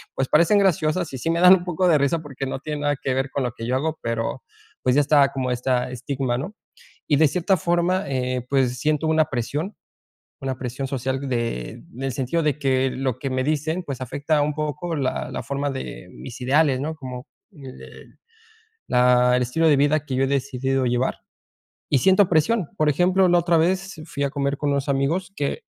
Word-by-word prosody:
pues, 135 - -1
parecen 170 +9 +4
graciosas, 175 -2 +1
y - - -4
sí 165 - -2
me 165 0 +1
dan 180 +1 +8
un 175 - -4
poco 180 +1 0
de 160 - +5
risa, 140 +4 +1
porque 140 -3 -6
no 130 - -4
tiene 150 0 -5
nada 145 0 +1
que 135 - -1
ver 135 +1 -1
con 140 - -1
lo 125 - -1
que 115 - -7
yo 125 - 0
hago, 155 +4 -2
pero, 115 +2 -3 0.4
pues, 125 0 +2
ya 145 - +5
está 140 -1 +4
como 130 -2 -2
esta 125 0 0
estigma, 130 0 -2
¿no? 190 +10 -6 0.5
Y 145 - +3
de 155 +2 +5
cierta 185 +3 +1
forma, 175 +3 +1
eh, 125 -2 -2
pues, 130 -3 +1
siento 150 +2 0
una 155 0 +3
presión, 150 - -3 0.6
una 130 -1 -3
presión 130 +2 -4
social 135 0 -3
de 115 - -2 0.2
en 125 - -8
el 135 -1 -1
sentido 135 +6 -1
de 150 -2 0
que 135 -2 +1
lo 130 -2 -2
que 135 0 -4
me 130 0 -1
dicen, 155 +4 -1
pues, 135 -4 -6
afecta 145 +4 0
un 150 +1 0
poco 155 +3 -3
la 135 -2 -2
la - - -4
forma 140 +1 -2
de 130 -8 -7
mis 120 - -9
ideales, 135 +1 +2
¿no? 155 +3 -3
Como 130 -1 -8 0.3
el 135 -7 -13 0.7
la 125 0 +4
el - - 0
estilo 160 +7 +1
de 145 - +4
vida 145 +2 +2
que 135 - -5
yo 135 - +1
he - - -2
decidido 135 -1 -1
llevar, 125 +1 0 0.7
y 140 - +4
siento 190 +5 +4
presión. 175 +3 +2
Por 155 - +3
ejemplo, 180 +5 +3
la 175 0 +4
otra 170 -1 +2
vez 185 +1 0
fui 140 -3 -4
a 140 - -1
comer 140 0 -1
con 145 - -1
unos 140 0 -1
amigos 145 +8 0
que 145 - -2
140 Hz, 210 wpm, -23 LUFS, 130-160 Hz, 0.7 s, dan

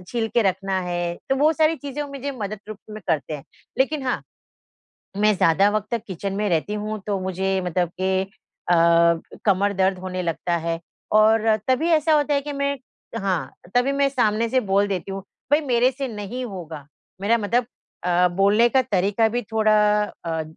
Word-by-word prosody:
छील 230 -2 -1
के 235 - +4
रखना 190 0 0
है, 175 -1 -2 0.2
तो 270 - +3
वो 300 +3 +4
सारी 315 +1 +2
चीज़ें 285 +1 -5
वो 290 - -7
मुझे 280 +1 -4
मदद 205 0 -4
रूप 215 -1 -7
में 215 - -7
करते 155 -2 0
हैं। 140 - -12 0.3
लेकिन 280 +2 +1
हाँ, 250 - 0 1.0
मैं 210 0 +3
ज़्यादा 180 +6 +4
वक़्त 215 0 -1
तक 230 -2 -1
किचन 195 +1 -4
में 210 +1 0
रहती 170 +4 0
हूँ 215 +1 -3
तो 200 -2 0
मुझे 190 +1 -1
मतलब 175 0 0
के 190 0 +1
अ, 195 - -12 1.2
कमर 200 0 +2
दर्द 190 0 +1
होने 185 0 -4
लगता 170 +1 -1
है 165 0 -2 0.3
और 220 +1 +4
तभी 260 +6 +2
ऐसा 315 0 +3
होता 295 -1 +2
है 280 - +2
कि 290 +1 -5
मैं 280 0 -1 0.4
हाँ, 180 -9 -1 0.2
तभी 250 +3 +3
मैं 280 0 +2
सामने 230 -3 +1
से 260 +2 +3
बोल 200 -2 +1
देती 195 -1 -3
हूँ, 195 0 -5 0.3
भई 295 - +5
मेरे 250 0 +3
से 270 +1 -4
नहीं 230 +3 -5
होगा, 165 - -8 0.3
मेरा 225 +4 +3
मतलब 230 +3 0 0.4
अ, 180 0 +3
बोलने 200 +6 +3
का 265 +1 +3
तरीक़ा 205 -1 +1
भी 240 +2 -1
थोड़ा 215 -1 +3 0.5
अ, 160 -1 -2
210 Hz, 185 wpm, -23 LUFS, 185-250 Hz, 1.2 s, भई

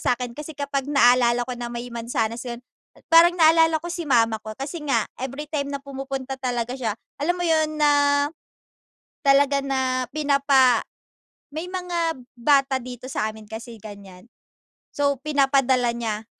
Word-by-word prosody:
sa’kin 245 -1 -1
kasi 305 +1 -7
kapag 280 -1 -3
naalala 245 -3 +4
ko 250 - -4
na 240 - -4
may 240 +1 -5
mansanas 230 0 -3
yun, 235 0 -6 0.5
parang 340 +1 +7
naalala 325 0 +5
ko 345 - -5
si 345 -2 -4
mama 230 -4 +3
ko, 215 - -7
kasi 295 +4 -6
nga 235 -6 +2 0.2
everytime 280 +2 -4
na 280 - -4
pumupunta 270 -1 -5
talaga 245 -1 -2
siya 225 -5 -2 0.2
alam 310 +5 +1
mo 355 - -2
yun 315 -1 +2
na, 295 -1 +5 1.4
talaga 280 0 +4
na 260 -2 -1
pinapa 275 -4 +3 0.7
may 320 +3 -4
mga 345 -4 -2 0.2
bata 275 +1 +3
dito 250 0 -9
sa 215 -3 -1
amin 215 0 -13
kasi 225 +2 -9
ganyan, 200 -3 -12 0.7
so 285 -1 +1
pinapadala 270 -4 +2
niya. 225 -2 -4
270 Hz, 145 wpm, -23 LUFS, 235-295 Hz, 1.4 s, parang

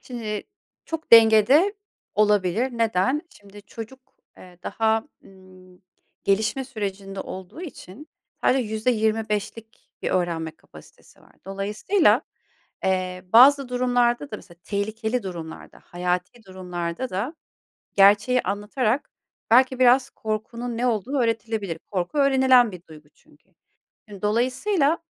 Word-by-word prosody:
Şimdi 220 -4 -5 0.4
çok 325 -5 -7
dengede 230 - +6 0.4
olabilir. 210 +3 +2
Neden? 225 +6 +1
Şimdi 205 0 -16
çocuk, 225 +5 -10 0.4
eee, 180 -1 -15
daha, 220 +1 0 0.2
emm, 185 -1 -18 0.5
gelişme 215 +7 +1
sürecinde 195 -5 -5
olduğu 190 - -9
için 290 - -11 0.4
sadece 265 - +4
%25'lik 220 -1 -2
bir - - -1
öğrenme 170 -3 -1
kapasitesi - - -19
var. - - -22
Dolayısıyla, 210 - +1 0.6
eee, 185 -1 -1
bazı 270 +3 +7
durumlarda 245 +1 +1
da - - -4
mesela 175 -3 -16
tehlikeli 220 +4 -2
durumlarda, 170 -4 -9
hayati 180 +6 -3
durumlarda 180 +4 -5
da 220 - -3 0.6
gerçeği 205 +6 +5
anlatarak 215 +6 -1 0.4
belki 255 +2 +4
biraz 255 +1 +4
korkunun 230 +2 -5
ne 245 - 0
olduğu 240 +4 -1
öğretilebilir. 220 -6 -2
Korku 185 +9 -2
öğrenilen 260 -4 +4
bir 180 -2 -10
duygu 150 -1 -15
çünkü. 150 +6 -27 0.7
Dolayısıyla 275 - +1
220 Hz, 105 wpm, -24 LUFS, 190-250 Hz, 0.7 s, bazı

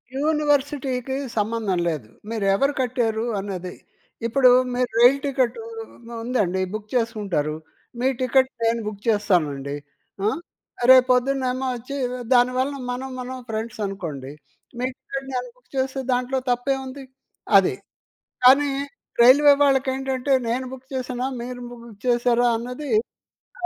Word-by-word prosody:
యూనివర్సిటీకి 285 -3 0 0.2
సంబంధం 210 -3 0
లేదు. 150 -10 -3 0.2
మీరు 225 -3 -2
ఎవరు 275 +8 +2
కట్టారు 235 -3 0 0.2
అన్నది. 185 -2 -5 0.5
ఇప్పుడు 255 +2 +5 0.2
మీరు 250 0 0
రైల్ 245 +3 +7
టికెటు 270 - 0 0.2
ఉ - - -11 0.4
ఉందండి, 205 -7 0
బుక్ 215 0 -5
చేసుకుంటారు. 205 -10 -1 0.4
మీ 255 - +2
టికెట్ 260 +1 +3
నేను 230 +1 +2
బుక్ 205 -1 -6
చేస్తానండి. 155 -10 +1 0.5
ఆ! - - +4 0.6
రేపు 255 -1 +7
పొద్దున్నేమో 260 0 +1
వచ్చి 250 +4 -7 0.4
దానివలన 255 +3 +2 0.2
మనం, 260 +2 -4
మనం 255 +1 -5
ఫ్రెండ్స్ 225 +1 -4
అనుకోండి. 160 -9 -5 0.5
మీ 250 - 0
టికెట్ 275 0 -6
నేను 250 0 -2
బుక్ 250 0 -31
చేస్తే 265 +1 -1
దాంట్లో 250 +2 0
తప్పేముంది! 265 +2 -1 0.5
అది. - - +3 0.7
కానీ 275 +3 +7 0.5
రైల్వే 285 +4 +8
వాళ్ళకి 270 -1 +3
ఏంటంటే 265 0 -1 0.2
నేను 250 +3 -1
బుక్ 260 0 -10
చేశానా 255 -1 -2
మీరు 245 +1 -6
బుక్ 235 -3 -12
చేశారా 245 0 +3
అన్నది 250 +5 -6
అయి - - +5 0.6
కా - - +3
250 Hz, 125 wpm, -23 LUFS, 220-265 Hz, 0.7 s, రైల్వే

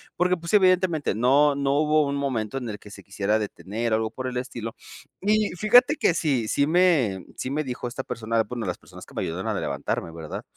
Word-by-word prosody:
porque 180 +1 +2
pues 170 +3 -7
evidentemente 185 - +3
no 140 +5 +4
no 140 -1 0
hubo 155 0 +3
un 140 - -2
momento 130 -5 -2
en 120 -3 -5
el 105 - -5
que 105 - -14
se 100 - -11
quisiera 100 +2 0
detener 110 +2 -3
o - - +4
algo 110 0 -2
por 130 +2 -5
el 125 -1 -4
estilo 120 -3 -5 0.5
y 210 +1 +2
fíjate 245 - +5
que - - +3
sí 140 -9 0
sí 140 +5 +1
me 155 - +2
sí 130 - -3
me 150 +2 -1
dijo 125 -2 -5
esta 130 +2 -5
persona 115 -2 -1
bueno 115 -1 -5
las 90 - -2
personas - - -13
que - - -16
me - - -2
ayudaron - - -4
a - - -1
levantarme 85 - -3
¿verdad? 80 -2 -7
130 Hz, 220 wpm, -25 LUFS, 110-160 Hz, 0.5 s, fíjate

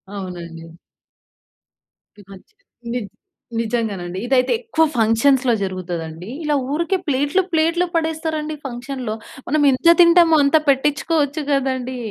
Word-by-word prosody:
అవునండి. 170 -3 -8 1.4
ఈ - - -12
మధ్య 195 - -15 0.4
నిజ 240 -4 -3 0.5
నిజంగానండి, 210 -6 -3
ఇదైతే 255 0 +2
ఎక్కువ 450 -9 0
ఫంక్షన్స్‌లో 240 +3 +3
జరుగుతదండి. 175 -2 -5
ఇలా 300 -1 +1 0.2
ఊరికే 335 +5 0
ప్లేట్లు 290 +6 +1
ప్లేట్లు 335 +2 +2
పడేస్తారండి 315 -1 -2
ఫంక్షన్‌లో. 250 -2 -5 0.3
మనం 300 +3 +1
ఎంత 335 +6 +5
తింటామో 340 -1 +6
అంత 280 +3 +4
పెట్టించుకోవచ్చు 290 +2 +1
గదండీ. 260 -2 -1
270 Hz, 105 wpm, -20 LUFS, 215-315 Hz, 1.4 s, తింటామో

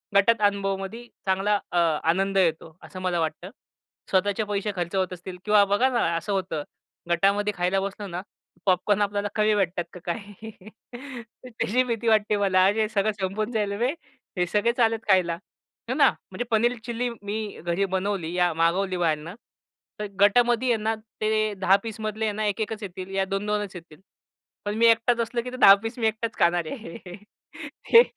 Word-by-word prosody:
गटात 210 +3 +4
अनुभवामध्ये 200 +3 -3 0.2
चांगला 195 +2 +1
अ, 175 - -1 0.3
आनंद 195 +4 +1
येतो, 165 -2 0
असं 185 - -9
मला 180 -2 0
वाटतं. 160 +3 -3 0.6
स्वतःचे 200 +3 +1
पैसे 205 0 -2
खर्च 175 +1 -3
होत 185 -1 0
असतील 180 +1 -8
किंवा 210 -1 +5
बघा 205 +7 +2
ना. 205 -9 +1
असं 170 +5 -3
होतं 185 -6 -2 0.5
गटामध्ये 200 +4 +2
खायला 180 +2 +1
बसलो 200 +1 -5
ना, 175 -1 -5 0.4
पॉपकॉर्न 195 +2 +2
आपल्याला 205 0 0
कमी 215 0 +3
भेटतात 180 -3 0
का 180 - -9
काय. 205 +4 -6 1.0
त्याची 250 0 0
भीती 235 -2 -3
वाटते 215 -1 +3
मला 190 -2 +3
हे 215 +2 +2
सगळं 215 -1 +1
संपून 200 +4 -2
जाईल 210 -3 -1
बे, 245 +2 +2 0.5
हे 180 - +2
सगळे 210 +5 +2
चाललेत 225 -2 +3
खायला, 185 -3 +4 0.6
हे - - +1
ना. - - +5 0.2
म्हणजे - - -3
पनीर 235 +2 +3
चिल्ली 240 +1 -2
मी 205 +1 -3 0.2
घरी 175 +4 0
बनवली 190 -3 -2
या 180 -1 +2
मागवली 180 +4 +1
बाहेरनं. 165 0 -1 0.6
तर 210 - -3
गटामध्ये 240 +4 +4
आहे - - +1
ना, 220 +1 +1 0.3
ते 215 0 +1
10 190 +1 +5
पीसमधले 220 -1 -4
यांना 215 0 -1
1-1 210 +2 -1
च - - -6
येतील, 185 -1 -7
या 195 0 +1
2-2 205 +2 -1
च 195 - -19
येतील. 165 -3 -12 0.7
पण 205 0 -2
मी 230 - +4
एकटाच 230 +1 +3
असलं, 235 +1 -2
की 250 +1 -7
ते 255 - -7
10 225 +1 +6
मी 225 - +2
एकटाच 220 +1 -3
खाणार 170 0 +3
आहे. 215 -10 -7 1.0
ते 465 +1 +10
200 Hz, 170 wpm, -25 LUFS, 185-220 Hz, 1.0 s, ते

